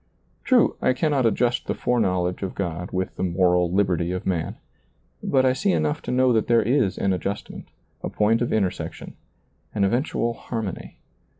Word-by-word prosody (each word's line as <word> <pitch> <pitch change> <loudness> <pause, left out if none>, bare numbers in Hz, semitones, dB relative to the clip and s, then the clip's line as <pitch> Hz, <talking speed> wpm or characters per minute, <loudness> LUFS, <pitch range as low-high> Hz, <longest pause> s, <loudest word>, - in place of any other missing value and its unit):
True, 255 -3 +3
I - - +3
cannot 135 -2 +1
adjust 120 +2 0
the - - -1
foreknowledge 90 -7 0
of 95 -2 -4
God 90 -2 -3
with 95 0 -3
the - - -2
moral 90 -1 +2
liberty 90 -3 +1
of 90 0 -4
man; 85 -4 -1 0.7
but 130 -1 +2
I 130 - +4
see 190 +8 +1
enough 150 0 0
to - - -5
know 130 0 +3
that 110 -2 +1
there 115 -2 +4
is 120 -3 +1
an 95 - +1
adjustment, 100 +2 -5 0.3
a - - -3
point 110 +2 +2
of 120 - 0
intersection, 100 -4 -2 0.6
an 100 - +2
eventual 120 +2 0
harmony. 110 -5 -6
105 Hz, 170 wpm, -24 LUFS, 90-125 Hz, 0.7 s, I